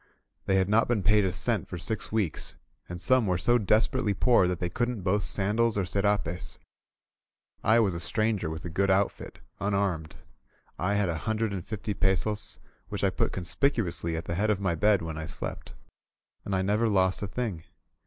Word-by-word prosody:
They 95 - +3
had 95 -1 +3
not 110 +3 +3
been 115 -5 0
paid 105 +3 +4
a 95 - +1
cent 90 - -1
for - - -6
six 110 +5 -3
weeks, 105 -7 -1 0.3
and 90 0 -5
some 115 +6 +3
were 90 -1 +1
so 120 +7 +3
desperately 110 +1 +2
poor 115 -2 +4
that 90 -1 -2
they 90 - -1
couldn't 120 +2 -2
boast 100 +2 +2
sandals 105 +3 +1
or 100 - +1
scrapes. 100 -2 -1 1.1
I 110 +2 +5
was 100 -5 +2
a 85 - -4
stranger 110 -1 0
with 80 +1 -6
a - - -3
good 100 +4 +1
outfit, 95 +1 0 0.2
unarmed. 100 -6 -1 0.6
I 100 +4 +1
had 105 -1 +2
a 80 -1 -2
hundred 110 -1 0
and 95 -3 -4
fifty 105 0 -4
pesos, 100 +2 0 0.3
which - - -4
I - - +3
put - - 0
conspicuously 85 - -1
at 80 - -5
the - - -3
head 105 +5 0
of 105 -3 +2
my 95 -3 0
bed 100 +2 +3
when 80 -1 -5
I 80 - -5
slept. - - -6 0.7
And 100 - -1
I 95 - +1
never 105 +4 +2
lost 95 -2 +2
a 100 - -2
thing. 100 -6 -4
100 Hz, 195 wpm, -28 LUFS, 90-110 Hz, 1.1 s, I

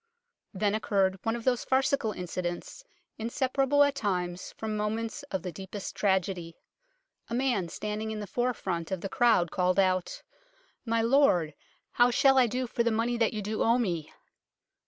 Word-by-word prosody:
Then 205 0 0
occurred 195 -3 +1
one 225 0 -1
of 235 - -6
those 245 -1 +1
farcical 265 -3 +1
incidents 180 - -5 0.4
inseparable 270 +4 +2
at 285 -1 +2
times 180 -8 -2
from 220 -1 -3
moments 220 +5 -2
of 190 -7 -3
the 180 - -4
deepest 190 +4 -7
tragedy. 190 -4 0 0.7
A 235 - -2
man 240 -9 0
standing 210 +4 -4
in 220 -1 -4
the 210 - -4
forefront 205 -7 -2
of 190 -3 -3
the 195 - -4
crowd 225 -9 +3
called 185 0 +1
out, 185 -2 +1 0.3
" - - -35 0.3
My 230 0 +1
lord, 230 - +3 0.4
how 245 0 +4
shall 270 +2 +4
I 250 - +5
do 250 +3 -2
for 235 - -2
the 235 - +2
money 230 +2 0
that 230 -2 +2
you 215 -2 -4
do 215 +2 -3
owe 230 +2 +4
me 175 -10 -2
215 Hz, 170 wpm, -29 LUFS, 185-240 Hz, 0.7 s, I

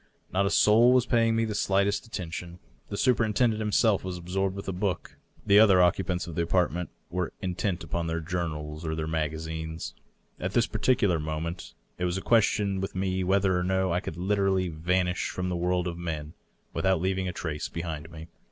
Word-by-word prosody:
Not 100 +1 +2
a - - +1
soul 110 +4 +5
was 125 -1 +4
paying 115 -2 +2
me 115 0 +2
the 110 - -3
slightest 100 +2 +1
attention. 85 -4 -6 0.3
The 100 - -4
superintendent 115 -2 +2
himself 105 -1 +2
was 95 -1 -4
absorbed 95 +2 -2
with 100 - -7
a - - 0
book; 95 0 -3 0.3
the 100 +1 +6
other 100 -4 +7
occupants 90 0 +2
of 85 - -7
the 85 - -1
apartment 90 0 0 0.2
were 90 0 -2
in 90 -1 -2
tent 90 0 -2
upon 85 -1 -2
their 80 0 -1
journals 80 -3 -4
or 80 -1 -2
their 80 -1 -2
magazines. 80 +1 -3 0.5
At 95 +2 -3
this 120 -1 +3
particular 100 -10 +2
moment 80 +3 -4 0.2
it 90 - 0
was 90 +1 0
a - - -3
question 105 -4 +2
with 95 - -4
me 95 0 0
whether 95 0 +2
or - - -1
no 95 -1 +1
I 90 - +2
could 85 -3 -6
literally 95 -1 +1
vanish 90 +3 0
from 90 0 -3
the 90 - -1
world 90 +1 0
of 85 -1 -5
men 80 -3 -4 0.4
without 95 -2 +2
leaving 95 +1 -1
a - - -1
trace 80 -3 -4
behind 80 -2 -5
me. 80 -1 -10
90 Hz, 195 wpm, -28 LUFS, 85-100 Hz, 0.5 s, other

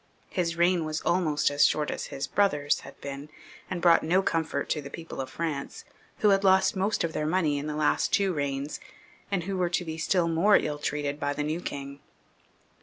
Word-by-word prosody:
His 170 -2 -1
reign 175 0 +3
was 155 0 -3
almost 155 -5 +1
as 145 0 +3
short 150 -1 +2
as - - -4
his 135 - -4
brother's 150 -8 +1
had - - -13
been, 140 +1 -7 0.4
and 175 -2 -4
brought 170 -1 +6
no 180 +4 +2
comfort 160 -5 -1
to 150 - 0
the 140 - -8
people 165 -1 -7
of 130 - -6
France, 150 -2 -4 0.4
who 210 - +5
had 195 0 +3
lost 190 0 +4
most 195 +3 0
of 165 -1 -2
their 150 - -1
money 155 -4 +1
in 145 - -5
the 150 - -3
last 150 0 +1
two 195 -2 +2
reigns, 145 -1 -3 0.5
and 195 -4 -1
who 195 +3 -3
were 180 -2 +1
to 175 0 -1
be 160 0 -5
still 175 +1 +2
more 170 +6 +4
ill 150 -1 -2
treated 145 0 -2
by 145 0 -1
the 150 - -2
new 155 +3 -2
king. 140 -3 -6
160 Hz, 210 wpm, -27 LUFS, 145-180 Hz, 0.5 s, brought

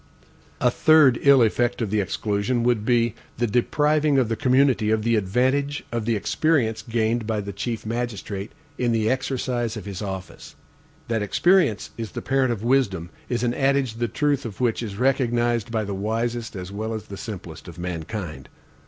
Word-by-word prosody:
A - - +3
third 155 -6 +5
ill 140 -3 +6
effect 120 +2 +1
of 110 -5 -2
the 105 - +2
exclusion 105 +5 -1
would 120 -3 +2
be, 120 -2 +2 0.2
the 120 - +1
depriving 150 +6 +2
the 120 -4 +2
community 130 -2 +3
of 110 0 +1
the 115 +1 +2
advantage 130 +8 0
of 115 -2 -2
the 115 0 +1
experience 115 +2 +1
gained 115 -1 -1
by 110 -2 0
the 100 0 -5
chief 115 +3 -4
magistrate 110 -3 -4 0.3
in 120 -2 +1
the 110 0 +2
exercise 125 -3 -2
of 105 - -7
his 100 -1 -6
office. 95 -2 -7 0.5
That 115 -2 0
experience 155 - +2
is 115 -2 -5
the - - -4
parent 135 -2 +2
of 110 -2 -3
wisdom, 110 -10 +1 0.2
is 120 -1 -1
an 120 -1 +1
adage 135 -3 +1
the 120 0 0
truth 145 +4 0
of 110 -4 -7
which 120 -3 +1
is 105 -4 -5
recognized 120 -2 +1
by 110 -2 0
the 100 -1 -4
wisest 115 +3 -2
as 90 0 -6
well 110 +2 -3
as 110 - -5
the 100 - -9
simplest 95 -7 -8
of 85 - -10
mankind. 85 0 -5
115 Hz, 180 wpm, -24 LUFS, 105-125 Hz, 0.5 s, ill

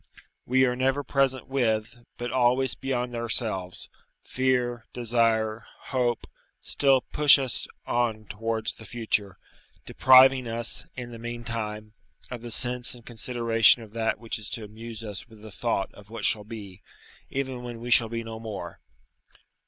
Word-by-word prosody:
We 130 +1 +4
are 125 -1 +1
never 135 +3 +1
present 135 -1 +1
with, 120 -3 -1
but 120 0 -4
always 130 0 +3
beyond 125 -2 -2
ourselves: 110 -6 0 0.4
fear, 125 -2 0
desire, 115 -2 +1 0.2
hope, 125 -3 0 0.3
still 135 -2 +3
push 150 +2 +5
us 130 -3 -3 0.2
on 115 -3 0
towards 110 +2 -2
the 110 - -13
future, 105 -4 -2 0.5
depriving 130 -1 +6
us, 115 0 -2
in 120 -1 -6
the 115 - -9
meantime, 115 -2 -5 0.4
of 125 -2 -5
the 120 - -7
sense 125 +1 -2
and 120 -1 -15
consideration 115 -1 +3
of 110 -1 -14
that 115 -1 0
which 115 0 -4
is 105 - -6
to 115 - -8
amuse 115 +1 -9
us 105 -3 -6
with 110 -2 -16
the 110 - -10
thought 105 0 -1
of 105 0 -15
what 115 -1 -3
shall 105 -2 +3
be, 105 -4 -9 0.5
even 130 -2 -3
when 120 -1 -7
we 120 +1 -6
shall 115 -1 +7
be 115 0 -3
no 115 0 -7
more. 105 -6 -7
115 Hz, 155 wpm, -27 LUFS, 110-125 Hz, 0.5 s, shall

